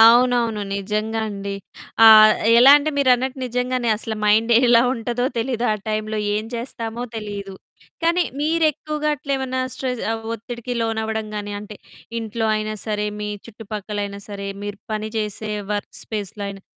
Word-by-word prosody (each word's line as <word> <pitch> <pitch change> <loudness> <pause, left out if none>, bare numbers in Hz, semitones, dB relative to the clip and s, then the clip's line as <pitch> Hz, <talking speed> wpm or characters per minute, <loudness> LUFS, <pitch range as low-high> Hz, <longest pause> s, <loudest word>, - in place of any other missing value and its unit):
అవునవును. 235 -1 +5 0.2
నిజంగా 215 +3 -2
అండి. 200 -1 -5 0.5
ఆహ్, 215 -1 +10 0.3
ఎలా 260 +3 +9
అంటే 310 +2 -1
మీరన్నట్టు 260 -1 +2
నిజంగానే 250 0 -1
అసలు 220 +1 -4
మైండ్ 220 +3 +4
ఎలా 235 -1 +6
ఉంటదో 240 +1 -2
తెలీదు. 240 0 -1
ఆ - - +1
టైమ్‌లో 215 0 -2 0.2
ఏం 215 - -1
చేస్తామో 235 -1 -4
తెలీదు. 200 -2 -6 0.5
కానీ 340 +2 +3 0.2
మీరెక్కువగా 305 -1 0
అట్లేమన్నా 265 -2 -2
స్ట్రెస్ 255 -2 -3 0.3
ఒత్తిడికి 235 +2 -6
లోనవ్వడం 220 -1 -1
కాని 205 0 -4
అంటే 210 0 -9 0.4
ఇంట్లో 225 0 -2
అయినా 215 0 -3
సరే 210 -1 -1
మీ 210 - -3 0.2
చుట్టుపక్కలైనా 205 -2 -5
సరే 200 -1 -6 0.2
మీరు 205 0 -5
పని 215 0 -2
చేసే 215 0 -3 0.2
వర్క్ 205 0 -4
స్పేస్‌లో 205 -1 -5
అయినా 195 -1 -8
225 Hz, 135 wpm, -22 LUFS, 210-245 Hz, 0.5 s, ఆహ్